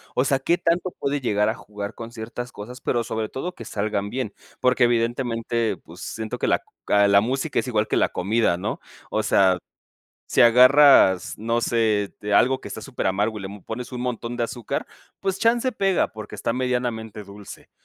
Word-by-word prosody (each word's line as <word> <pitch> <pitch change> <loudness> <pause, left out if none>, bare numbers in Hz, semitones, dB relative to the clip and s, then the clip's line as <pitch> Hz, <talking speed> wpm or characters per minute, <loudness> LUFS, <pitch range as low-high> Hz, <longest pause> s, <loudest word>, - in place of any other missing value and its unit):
O 130 - +2
sea, 135 -1 +2
qué 170 +6 +1
tanto 175 +1 0
puede 140 0 -1
llegar 105 -3 +1
a - - 0
jugar 105 -2 -7
con 115 0 -8
ciertas 120 +2 -7
cosas, 120 +5 -9
pero 120 -1 0
sobre 110 -1 -3
todo 175 +7 -5
que 115 - -10
salgan 105 -2 -2
bien. 125 -5 -3 0.3
Porque 125 -1 +3
evidentemente, 115 -2 0
pues, 85 +3 -14
siento 110 -1 -5
que - - 0
la - - +1 0.2
ca 100 0 +4
la 100 0 +5
música 135 +6 -1
es - - -3
igual 110 -3 0
que - - 0
la - - +3
comida, 100 -2 +1
¿no?, 105 +5 -3 0.3
o - - +1
sea, 95 -2 +3 0.7
si - - +2
agarras, 125 - +6
no 115 +2 0
sé, 110 -3 +1
de 105 0 -1
algo 130 +3 +4
que - - -8
está - - -7
superamargo 105 -4 -1
y - - -9
l - - -4
le 100 0 -10
pones 120 +2 -6
un 125 - -4
montón 120 -1 -3
de 120 - 0
azúcar, 120 -1 -4 0.3
pues 195 -1 -1
chance 240 +3 +2
pega, 195 -3 +1
porque 110 -1 -9
está 110 - -1
medianamente 120 -4 -2
dulce. 100 +1 -12
115 Hz, 195 wpm, -23 LUFS, 105-125 Hz, 0.7 s, agarras